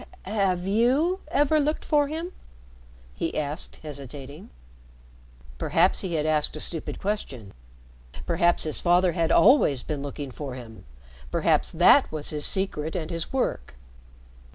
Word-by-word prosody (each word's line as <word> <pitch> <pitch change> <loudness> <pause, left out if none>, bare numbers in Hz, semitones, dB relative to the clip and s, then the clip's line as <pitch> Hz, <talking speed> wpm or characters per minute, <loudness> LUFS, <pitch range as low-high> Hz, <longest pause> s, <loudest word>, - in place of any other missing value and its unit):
"Have 190 -3 0
you 255 - +2
ever 295 +1 +2
looked 300 +1 -1
for 295 -2 +2
him?" 325 +4 -5 0.8
he 165 - -3
asked 150 +2 -3
hesitating. 140 +1 -9 1.1
Perhaps 175 +4 +2
he 180 -4 -3
had 150 -1 0
asked 155 -1 0
a - - -6
stupid 165 0 -3
question 135 - -4 0.7
perhaps 170 +1 +2
his 155 - -1
father 180 +1 +3
had 165 -2 0
always 200 - +5
been 150 -2 -4
looking 140 -1 -6
for 135 0 -6
him, 115 - -11 0.4
perhaps - - +1
that - - +5
was 155 -2 -4
his 150 -1 0
secret 165 -5 -2
and 165 -2 -4
his 165 -1 -4
work. 65 - -2
165 Hz, 135 wpm, -25 LUFS, 145-205 Hz, 1.1 s, always